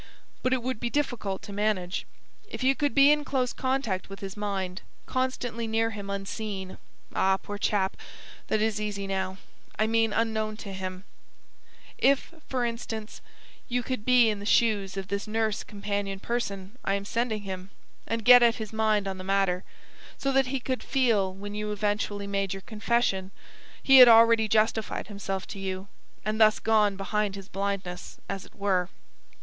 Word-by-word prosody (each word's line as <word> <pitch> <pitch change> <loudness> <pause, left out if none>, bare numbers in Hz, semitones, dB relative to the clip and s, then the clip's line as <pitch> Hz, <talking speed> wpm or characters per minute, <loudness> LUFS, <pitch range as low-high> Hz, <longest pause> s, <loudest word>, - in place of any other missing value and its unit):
But 255 - +1
it 255 -2 +1
would 255 -3 -2
be 240 - -1
difficult 245 -9 -2
to 200 - -8
manage. 200 -3 -1 0.4
If - - -5
you 265 +1 +5
could 290 -3 -1
be 280 +1 +7
in 300 0 +2
close 260 -4 -1
contact 260 -9 -1
with 195 - -8
his 195 -1 -6
mind, 195 -3 -3 0.2
constantly 245 -3 -2
near 225 +1 +1
him 205 -2 -7
unseen 195 -1 -5 0.3
ah, 190 0 +3
poor 205 +1 -7
chap, 195 -2 +1 0.5
that 215 0 +1
is 215 -1 0
easy 205 -2 -3
now 190 -1 -2 0.4
I 215 - +3
mean 225 0 +2
unknown 220 -1 -1
to 200 -3 -7
him; 185 0 -5 1.0
if, 275 +4 +2 0.2
for 255 -2 0
instance, 225 -2 -5 0.5
you 245 0 -1
could 255 -3 -3
be 250 -1 +5
in 210 - -4
the 200 - -7
shoes 205 -5 +2
of 190 -1 -5
this 200 +2 -2
nurse 220 -1 0
companion 200 -1 -3
person 205 -1 -4
I 195 - +1
am 200 0 -4
sending 225 -1 -1
him, 190 -1 -6 0.4
and 230 -1 -2
get 245 0 +10
at 235 -1 +5
his 220 -2 -6
mind 215 -2 +2
on 190 -1 -4
the - - -6
matter; 195 -1 +1 0.5
so 275 - 0
that 270 -1 +3
he 270 +1 -1
could 255 +1 -3
feel 225 -8 +2
when 200 +2 -8
you 210 0 -3
eventually 205 0 -1
made 195 -1 -1
your 195 - -7
confession, 215 -3 0 0.5
he 270 -1 +8
had 250 - +12
already 230 -1 +7
justified 220 0 +1
himself 195 -2 -4
to 200 - -6
you, 190 0 -4 0.4
and 215 +1 -1
thus 215 0 +6
gone 210 -3 +3
behind 200 +1 -1
his 195 -1 -9
blindness, 195 -3 -4
as 195 -1 -4
it - - -23
were." 185 -3 +1
210 Hz, 175 wpm, -27 LUFS, 195-230 Hz, 1.0 s, had